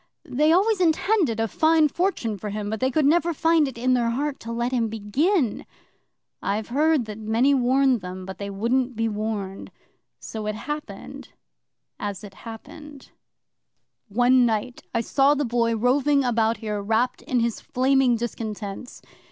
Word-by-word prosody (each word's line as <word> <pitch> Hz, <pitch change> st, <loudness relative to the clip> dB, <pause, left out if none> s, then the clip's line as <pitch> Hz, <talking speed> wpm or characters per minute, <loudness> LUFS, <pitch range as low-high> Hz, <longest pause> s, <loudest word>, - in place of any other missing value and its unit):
They 300 Hz, +5 st, +2 dB
always 395 Hz, +3 st, +3 dB
intended 330 Hz, -, +2 dB
a 225 Hz, -, +1 dB
fine 315 Hz, +5 st, +3 dB
fortune 295 Hz, -, -1 dB
for 210 Hz, -, -5 dB
him 205 Hz, 0 st, -4 dB
but 220 Hz, -, -3 dB
they 260 Hz, -, +1 dB
could 300 Hz, +2 st, +1 dB
never 335 Hz, +2 st, +2 dB
find 325 Hz, -1 st, +3 dB
it 265 Hz, -, -7 dB
in 255 Hz, +2 st, +1 dB
their 240 Hz, -2 st, +2 dB
heart 275 Hz, +4 st, -2 dB
to 230 Hz, -, -7 dB
let 235 Hz, +1 st, -1 dB
him 240 Hz, -3 st, +1 dB
begin. 230 Hz, -, 0 dB, 0.8 s
I've 205 Hz, +2 st, -2 dB
heard 295 Hz, 0 st, +2 dB
that 215 Hz, 0 st, -8 dB
many 225 Hz, +6 st, +2 dB
warned 260 Hz, -1 st, +3 dB
them, 185 Hz, +1 st, -7 dB
but 190 Hz, -1 st, -8 dB
they 200 Hz, 0 st, -4 dB
wouldn't 240 Hz, +5 st, 0 dB
be 225 Hz, +1 st, 0 dB
warned. 210 Hz, -3 st, -4 dB, 0.5 s
So 215 Hz, -1 st, -6 dB
it 215 Hz, -, -2 dB
happened 295 Hz, +7 st, -7 dB, 0.7 s
as 205 Hz, -1 st, -5 dB
it 200 Hz, -2 st, -10 dB, 0.2 s
happened. 285 Hz, +5 st, -11 dB, 1.0 s
'One 245 Hz, +4 st, +3 dB
hot 245 Hz, -, +5 dB
night 230 Hz, +3 st, -3 dB
I 230 Hz, -, 0 dB
saw 275 Hz, +5 st, +3 dB
the 290 Hz, 0 st, -1 dB
Boy 230 Hz, -1 st, +1 dB
roving 275 Hz, +5 st, +2 dB
about 230 Hz, -2 st, +1 dB
here 210 Hz, -2 st, -4 dB
wrapped 225 Hz, +5 st, 0 dB
in 250 Hz, -, -1 dB
his 230 Hz, -1 st, -1 dB
flaming 260 Hz, -1 st, +2 dB
discontents. 220 Hz, -1 st, -6 dB
240 Hz, 165 wpm, -24 LUFS, 220-280 Hz, 1.0 s, hot